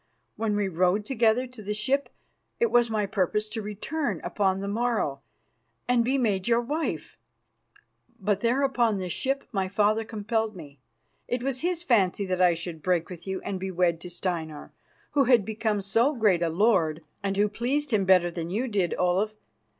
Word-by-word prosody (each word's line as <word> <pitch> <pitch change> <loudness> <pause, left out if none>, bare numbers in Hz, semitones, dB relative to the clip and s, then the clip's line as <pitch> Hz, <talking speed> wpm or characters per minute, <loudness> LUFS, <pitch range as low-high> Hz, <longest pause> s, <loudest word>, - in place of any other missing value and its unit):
When 215 -1 -1
we 205 -1 +1
rode 185 +3 +1
together 235 0 +2
to 250 -3 -11
the 210 +1 -3
ship, 270 +6 0 0.5
it 470 - +2
was 240 -1 +4
my 215 -2 0
purpose 205 +1 0
to 220 +1 -4
return 215 +9 -3
upon 195 -2 0
the 200 - -4
morrow 210 - -1 0.7
and 245 -1 +3
be 260 +4 +1
made 205 -7 0
your 235 0 +4
wife. 240 - -3 1.0
But 200 0 0
there 240 +5 +1
upon 240 -6 +2
the 185 -1 -4
ship 270 +9 -2
my 195 -4 -1
father 210 +3 +2
compelled 220 0 -2
me. 145 -5 -11 0.5
It 245 0 -2
was 265 -1 -1
his 345 0 -1
fancy 200 - +2
that 185 -1 -1
I 175 -2 +5
should 165 -1 -7
break 175 0 0
with 180 +1 -10
you 190 0 -3
and 195 -2 -4
be 190 +1 -3
wed 170 -2 +1
to 180 - -8
Steinar, 170 -4 -4 0.4
who 285 -2 +3
had 240 -5 +4
become 215 -1 -1
so 230 +9 +2
great 205 -7 +3
a 170 - +1
lord 165 -4 +2 0.2
and 195 -1 -2
who 205 +1 +4
pleased 255 +7 -1
him 210 -3 +3
better 180 -2 +4
than 170 -1 -5
you 225 +8 -1
did, 195 -7 0
Olaf. 190 +4 +1
210 Hz, 185 wpm, -27 LUFS, 185-235 Hz, 1.0 s, I